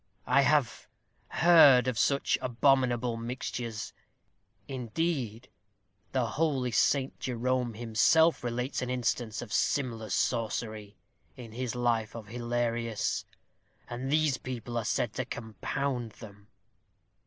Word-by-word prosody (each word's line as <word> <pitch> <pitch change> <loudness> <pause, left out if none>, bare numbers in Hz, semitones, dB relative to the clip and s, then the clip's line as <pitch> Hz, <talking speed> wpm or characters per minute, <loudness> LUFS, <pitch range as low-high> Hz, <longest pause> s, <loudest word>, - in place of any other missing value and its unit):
"I 140 - +4
have 145 -2 +1 0.4
heard 145 -7 +6
of 125 -3 -1
such 140 0 +2
abominable 125 -2 +2
mixtures; 115 -1 -5 0.7
indeed, 130 -2 -3 0.6
the 130 -2 +1
holy 135 0 0
St. 135 +4 +1
Jerome 125 -1 -1
himself 120 +9 +3
relates 125 +3 -2
an 125 - -3
instance 120 -2 -1
of 110 - -9
similar 115 -6 0
sorcery, 110 -3 -2 0.4
in 120 -3 -9
his 125 +1 -4
life 115 -3 0
of 110 -3 -8
Hilarius; 120 -1 -2 0.6
and 125 +3 -4
these 155 -3 +2
people 120 -2 -6
are 115 -2 -1
said 115 0 0
to 130 - -3
compound 120 - -4
them." 105 -2 -13
120 Hz, 110 wpm, -29 LUFS, 115-130 Hz, 0.7 s, heard